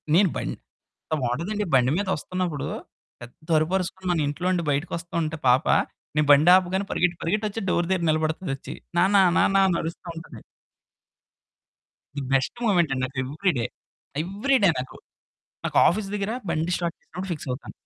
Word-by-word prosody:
నేను 190 Hz, +1 st, +5 dB
బం -, -, -3 dB
ఎంత -, -, -23 dB
బావుంటదండి. 170 Hz, -, -1 dB
బండి 125 Hz, 0 st, +4 dB
మీదొస్తున్నప్పుడు, 180 Hz, -4 st, -2 dB, 0.5 s
పెద్ద 120 Hz, +6 st, -13 dB
అరుపరుసుకొని 185 Hz, +3 st, -1 dB
మన 170 Hz, -, +1 dB
ఇంట్లో 150 Hz, +5 st, -4 dB
ఉండి 175 Hz, -2 st, 0 dB
బయటకి 145 Hz, +4 st, -2 dB
వస్తుంటే 165 Hz, -2 st, -3 dB
పాప, 125 Hz, +1 st, +4 dB, 0.5 s
నేను 150 Hz, -1 st, +2 dB
బండి 145 Hz, +4 st, +6 dB
ఆపగానే 190 Hz, +1 st, +1 dB
పరిగెత్తి 175 Hz, -1 st, +1 dB
పరిగెట్టి 210 Hz, +6 st, 0 dB
వచ్చి 225 Hz, +2 st, -5 dB
డోర్ 175 Hz, -1 st, +1 dB
దగ్గర 185 Hz, -3 st, +1 dB
నిలబడతదొచ్చి. 155 Hz, -2 st, -2 dB, 0.2 s
"నాన్న 190 Hz, +4 st, +4 dB, 0.2 s
నాన్న" 195 Hz, -, +3 dB
అని 175 Hz, -3 st, +1 dB
అరుస్తా 165 Hz, +2 st, -6 dB
ఉంటది. 165 Hz, -, -10 dB, 1.8 s
ది -, -, -1 dB
బెస్ట్ 135 Hz, -, +1 dB
మొమెంట్ 175 Hz, -8 st, +3 dB
అండి. 130 Hz, -, -2 dB
నాకు 130 Hz, +1 st, -9 dB
ఎవ్రీడే. 145 Hz, -2 st, -1 dB, 0.6 s
ఎవ్రీడే 205 Hz, +3 st, +2 dB
నాకు. 130 Hz, +1 st, -7 dB, 0.7 s
నాకు -, -, -3 dB
ఆఫీస్ 200 Hz, +3 st, -1 dB
దగ్గర 205 Hz, +1 st, -2 dB, 0.2 s
బండి 160 Hz, +3 st, -1 dB
స్టార్ట్ 170 Hz, -1 st, -3 dB
చేసినప్పుడు 185 Hz, +3 st, -8 dB
ఫిక్స్ 150 Hz, -4 st, -6 dB
అవుతాను. 125 Hz, +3 st, -5 dB
170 Hz, 150 wpm, -25 LUFS, 150-190 Hz, 1.8 s, బండి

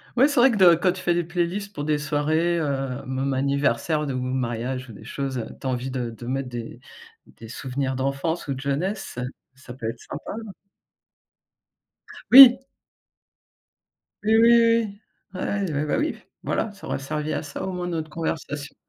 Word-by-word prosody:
Ouais, 260 Hz, +3 st, +5 dB
c'est 285 Hz, -4 st, +1 dB
vrai 265 Hz, +2 st, +6 dB
que -, -, -1 dB
de 185 Hz, -4 st, +7 dB
quand 180 Hz, +2 st, +2 dB
tu 185 Hz, -, -8 dB
fais 175 Hz, -, +1 dB
des 175 Hz, -, 0 dB
playlists 175 Hz, +4 st, -3 dB
pour 145 Hz, -, -5 dB
des 150 Hz, 0 st, +1 dB
soirées, 155 Hz, +3 st, 0 dB
heu, 135 Hz, -3 st, -2 dB
même 130 Hz, +1 st, -2 dB
anniversaire 140 Hz, +4 st, 0 dB
de 135 Hz, -, -2 dB
ou -, -, -2 dB
de -, -, -2 dB
mariage 125 Hz, 0 st, -3 dB
ou -, -, -9 dB
des 105 Hz, -, -12 dB
choses, 135 Hz, +2 st, -4 dB
heu, 115 Hz, -, -4 dB
tu 135 Hz, -, -5 dB
as -, -, 0 dB
envie 130 Hz, +1 st, -2 dB
de 125 Hz, -2 st, -3 dB
de 115 Hz, +1 st, -10 dB
mettre 130 Hz, +1 st, -3 dB
des 120 Hz, -2 st, -7 dB, 0.5 s
des 115 Hz, -, -13 dB
souvenirs 130 Hz, +2 st, -3 dB
d'enfance 140 Hz, +6 st, -2 dB
ou 140 Hz, -, -1 dB
de 130 Hz, -, -7 dB
jeunesse, 150 Hz, -, -3 dB, 0.3 s
ça 130 Hz, -1 st, -12 dB
peut 120 Hz, -3 st, -6 dB
être 115 Hz, +1 st, -7 dB
sympa. 155 Hz, -, -8 dB, 2.0 s
Oui. 260 Hz, -1 st, +11 dB, 1.6 s
Oui, 220 Hz, +1 st, +3 dB
oui, 230 Hz, +1 st, +6 dB
oui. 230 Hz, -3 st, +3 dB, 0.4 s
Ouais. 200 Hz, -1 st, -1 dB
Ah 150 Hz, -, 0 dB
bah 150 Hz, -, 0 dB
oui, 305 Hz, +2 st, -1 dB, 0.3 s
voilà, 220 Hz, -, -1 dB
ça -, -, -11 dB
aura -, -, -2 dB
servi 150 Hz, +3 st, -3 dB
à -, -, -2 dB
ça 145 Hz, -2 st, -6 dB
au 190 Hz, -, -3 dB
moins 180 Hz, -1 st, -4 dB
notre 160 Hz, -2 st, -3 dB
conversation. 150 Hz, -3 st, -4 dB
145 Hz, 185 wpm, -24 LUFS, 130-180 Hz, 2.0 s, Oui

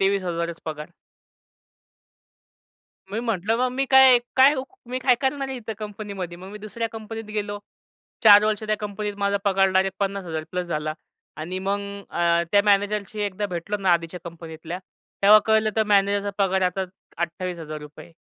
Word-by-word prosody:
23,000च 175 Hz, -4 st, -1 dB
पगार. 155 Hz, -1 st, -5 dB, 2.2 s
मी 220 Hz, +3 st, -2 dB
म्हटलं 225 Hz, -1 st, 0 dB
मग 255 Hz, 0 st, +1 dB
मी 270 Hz, +2 st, 0 dB
काय, 265 Hz, -2 st, +7 dB, 0.2 s
काय 270 Hz, +3 st, +7 dB
उ 260 Hz, -, -2 dB, 0.3 s
मी 255 Hz, -, -1 dB
काय 255 Hz, -1 st, +4 dB
करणार 275 Hz, 0 st, -1 dB
आहे 265 Hz, -, -4 dB
इथं 225 Hz, -2 st, -6 dB
कंपनीमध्ये. 200 Hz, -4 st, -6 dB
मग 185 Hz, -, -10 dB
मी 210 Hz, -, -8 dB
दुसऱ्या 225 Hz, +2 st, -4 dB
कंपनीत 225 Hz, 0 st, -7 dB
गेलो. 205 Hz, -1 st, -2 dB, 0.6 s
4 210 Hz, -2 st, +9 dB
वर्ष 215 Hz, 0 st, 0 dB
त्या 215 Hz, 0 st, 0 dB
कंपनीत 210 Hz, 0 st, -4 dB
माझा 200 Hz, 0 st, +1 dB
पगार 195 Hz, -1 st, +3 dB
डायरेक्ट 190 Hz, 0 st, +1 dB
50,000 190 Hz, -5 st, -2 dB
प्लस 180 Hz, 0 st, -3 dB
झाला. 155 Hz, -2 st, -2 dB, 0.4 s
आणि 175 Hz, +4 st, -4 dB
मग 195 Hz, +2 st, -1 dB, 0.3 s
अ, 170 Hz, 0 st, +2 dB
त्या 205 Hz, 0 st, +5 dB
मॅनेजरशी 205 Hz, +1 st, +1 dB
एकदा 205 Hz, 0 st, -2 dB
भेटलो 180 Hz, +3 st, -3 dB
ना 190 Hz, -3 st, +2 dB
आधीच्या 170 Hz, +1 st, -1 dB
कंपनीतल्या, 165 Hz, 0 st, -7 dB, 0.4 s
तेव्हा 210 Hz, +2 st, +9 dB
कळलं 220 Hz, 0 st, +3 dB
तर 220 Hz, -, +4 dB
मॅनेजरचा 200 Hz, 0 st, +2 dB
पगार 190 Hz, -1 st, +2 dB
आता 185 Hz, +1 st, 0 dB, 0.3 s
₹28,000 165 Hz, -3 st, -5 dB
200 Hz, 155 wpm, -24 LUFS, 175-215 Hz, 2.2 s, 4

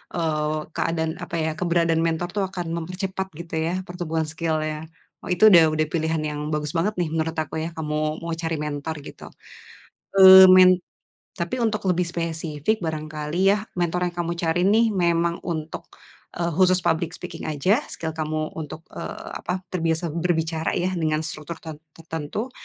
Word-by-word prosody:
eee, 155 Hz, -2 st, 0 dB, 0.2 s
keadaan, 160 Hz, -1 st, 0 dB
apa 170 Hz, -, -5 dB
ya, 160 Hz, -, 0 dB
keberadaan 170 Hz, -2 st, +2 dB
mentor 165 Hz, +2 st, -1 dB
itu 205 Hz, -, -1 dB
akan 175 Hz, -2 st, -5 dB
mempercepat 190 Hz, +3 st, -4 dB
gitu 170 Hz, -1 st, -9 dB
ya -, -, -1 dB, 0.2 s
pertumbuhan 165 Hz, -3 st, -2 dB
skill-nya. 155 Hz, -1 st, -2 dB, 0.3 s
Oh -, -, -9 dB
itu 180 Hz, -, -1 dB
udah 170 Hz, -2 st, +9 dB
udah 155 Hz, 0 st, +1 dB
pilihan 160 Hz, 0 st, 0 dB
yang 150 Hz, -, -5 dB
bagus 150 Hz, -1 st, -2 dB
banget 205 Hz, +6 st, +1 dB
nih 170 Hz, -, +1 dB
menurut 160 Hz, 0 st, -1 dB
aku 155 Hz, -1 st, -3 dB
ya, 165 Hz, -, -3 dB
kamu 150 Hz, -1 st, -3 dB, 0.3 s
mau 170 Hz, -, -3 dB
cari 160 Hz, 0 st, -1 dB
mentor 150 Hz, +2 st, -4 dB
gitu, -, -, -12 dB, 1.0 s
eee, 190 Hz, 0 st, +11 dB
men 185 Hz, 0 st, +8 dB, 0.6 s
tapi 170 Hz, +6 st, -3 dB
untuk 210 Hz, -3 st, -1 dB
lebih 180 Hz, 0 st, +2 dB
spesifik, 165 Hz, +2 st, -2 dB
barangkali 155 Hz, +4 st, 0 dB
ya 210 Hz, -, -4 dB, 0.2 s
mentor 175 Hz, +1 st, 0 dB
yang 175 Hz, -, 0 dB
kamu 170 Hz, 0 st, -1 dB
cari 170 Hz, 0 st, 0 dB
nih 225 Hz, +2 st, +4 dB
memang 170 Hz, -2 st, +1 dB
untuk, 160 Hz, -2 st, -4 dB, 0.5 s
eee, 170 Hz, 0 st, -1 dB
khusus 185 Hz, +1 st, +3 dB
public 170 Hz, +1 st, 0 dB
speaking 175 Hz, -3 st, -7 dB
aja, 155 Hz, -, +2 dB
skill 160 Hz, -1 st, -5 dB
kamu 155 Hz, 0 st, -3 dB
untuk, 160 Hz, 0 st, -7 dB
eee, -, -, -7 dB
apa, 185 Hz, +1 st, -3 dB
terbiasa 165 Hz, -2 st, -1 dB
berbicara 165 Hz, -1 st, -1 dB
ya 180 Hz, +1 st, 0 dB
dengan 155 Hz, -2 st, 0 dB
struktur 160 Hz, 0 st, -6 dB
ter 160 Hz, -2 st, -8 dB, 0.2 s
tertentu? 165 Hz, -, -5 dB
165 Hz, 165 wpm, -24 LUFS, 160-180 Hz, 1.0 s, eee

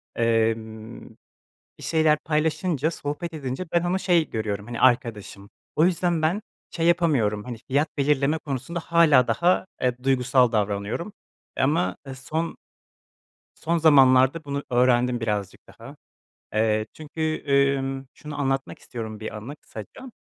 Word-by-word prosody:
emm, 115 Hz, -1 st, -1 dB, 0.7 s
bir -, -, -13 dB
şeyler 155 Hz, -2 st, +2 dB
paylaşınca, 160 Hz, 0 st, 0 dB
sohbet 160 Hz, +2 st, -5 dB
edince 135 Hz, +3 st, -4 dB
ben 170 Hz, 0 st, +2 dB
onu 180 Hz, +2 st, 0 dB
şey 175 Hz, -5 st, +2 dB
görüyorum, 105 Hz, -2 st, -3 dB
hani, 120 Hz, -1 st, -6 dB
arkadaşım. 110 Hz, -5 st, +1 dB, 0.3 s
O 155 Hz, -, +5 dB
yüzden 175 Hz, -2 st, +1 dB
ben 180 Hz, +7 st, +1 dB, 0.3 s
şey 165 Hz, -1 st, -1 dB
yapamıyorum, 130 Hz, -12 st, +2 dB
hani, 120 Hz, -1 st, -6 dB
fiyat 145 Hz, +4 st, +2 dB
belirleme 145 Hz, +2 st, +2 dB
konusunda 145 Hz, +4 st, -4 dB
hâlâ 160 Hz, -7 st, +4 dB
daha, 175 Hz, +10 st, +2 dB, 0.2 s
eee, 125 Hz, -1 st, +2 dB
duygusal 130 Hz, -2 st, +3 dB
davranıyorum. 105 Hz, -, -2 dB, 0.5 s
Eee, -, -, +1 dB
ama 130 Hz, -, +1 dB, 0.2 s
son 160 Hz, +5 st, -4 dB, 1.0 s
son 170 Hz, +1 st, -1 dB
zamanlarda 135 Hz, -1 st, +5 dB
bunu 140 Hz, 0 st, -3 dB
öğrendim 125 Hz, 0 st, +3 dB
birazcık 105 Hz, -4 st, -3 dB
daha. -, -, -13 dB, 0.6 s
Eee, 110 Hz, 0 st, +1 dB
çünkü, 155 Hz, 0 st, -4 dB, 0.3 s
ımm, 135 Hz, 0 st, -4 dB
şunu 150 Hz, -1 st, -8 dB
anlatmak 135 Hz, 0 st, -1 dB
istiyorum, 110 Hz, -3 st, -7 dB
bir 110 Hz, 0 st, -6 dB
anı 130 Hz, +8 st, -8 dB
kısaca. 115 Hz, -, -11 dB
135 Hz, 130 wpm, -24 LUFS, 115-160 Hz, 1.0 s, O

